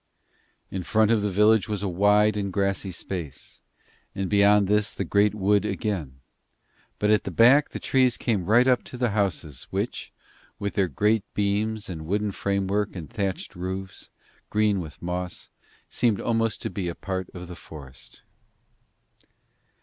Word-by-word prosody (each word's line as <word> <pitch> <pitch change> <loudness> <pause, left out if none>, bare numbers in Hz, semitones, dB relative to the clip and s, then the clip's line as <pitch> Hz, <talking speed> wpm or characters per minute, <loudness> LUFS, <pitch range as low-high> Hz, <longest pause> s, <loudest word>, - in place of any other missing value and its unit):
In 95 - -3
front 110 +4 +2
of 110 -2 +3
the 105 - 0
village 105 +3 +3
was 105 -2 -2
a - - 0
wide 105 +3 +3
and 100 -2 -2
grassy 100 0 -1
space, 85 -5 -6 0.5
and 95 0 -3
beyond 100 0 +5
this 105 +1 +1
the - - -2
great 105 +1 +2
wood 100 0 +2
again, 85 - -3 0.8
but 105 0 +2
at 105 - +3
the - - -4
back 135 +6 +5
the - - -6
trees 130 -2 +2
came 105 -7 -1
right 120 +5 +5
up 125 -1 +3
to 125 - -9
the 120 -3 0
houses, 90 - -2
which, - - -3 0.5
with 100 0 -3
their 100 -2 +2
great 105 - +1
beams 105 +1 -1
and 80 -4 -7
wooden 105 +3 0
framework 100 +1 -1
and 80 -6 -7
thatched 100 -3 -3
roofs, 95 +2 -6 0.4
green 105 -2 +2
with 80 -2 -9
moss, 90 0 -4 0.4
seemed 115 -4 +1
almost 115 -2 0
to - - -3
be 90 -1 -3
a 85 - -4
part 95 -2 -4
of 90 0 -7
the 90 - -8
forest. 70 -7 -13
100 Hz, 160 wpm, -25 LUFS, 90-105 Hz, 0.8 s, beyond